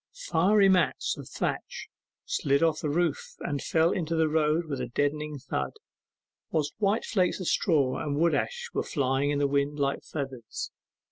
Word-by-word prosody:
Fiery 195 +4 +5
mats 180 -9 +2
of - - -10
thatch - - -3 0.4
slid 140 +2 +1
off 160 -2 +2
the 150 - -2
roof 175 - -1
and 145 -1 -2
fell 165 +1 +2
into 165 -2 -1
the 160 -1 +3
road 155 +2 +2
with 140 -4 -4
a 125 - -2
deadened 145 +2 -2
thud, 140 - -2 0.8
whilst 150 -2 0
white 205 +1 +1
flakes 185 -3 +1
of 185 - -4
straw 145 -9 +2
and 145 -1 -2
wood 165 +1 +3
ash 480 - -2
were - - 0
flying 135 -1 0
in 145 - +1
the 145 - +2
wind 140 +1 0
like 140 -1 0
feathers. 135 -6 -5
150 Hz, 175 wpm, -28 LUFS, 140-170 Hz, 0.8 s, Fiery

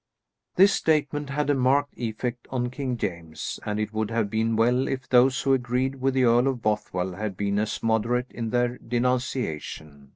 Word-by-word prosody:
This 195 +2 +6
statement 150 -2 0
had 145 +1 0
a - - +4
marked 140 +2 +2
effect 120 +1 -4
on 125 -2 -2
King 130 -2 -3
James, 85 -6 -5
and 105 0 -1
it 105 0 -3
would 110 -1 -1
have 115 -3 -1
been 110 +1 +1
well 120 +4 +2
if 130 -1 -3
those 130 +1 +4
who 135 - +3
agreed 130 +1 -1
with 135 0 +1
the 130 - +3
Earl 120 +2 +4
of 130 -3 -1
Bothwell 95 -4 -1
had 100 0 -4
been 100 0 0
as 105 0 -2
moderate 115 +3 +1
in 115 -1 -4
their 120 +1 0
denunciation. 120 - -3
120 Hz, 185 wpm, -25 LUFS, 110-130 Hz, -, This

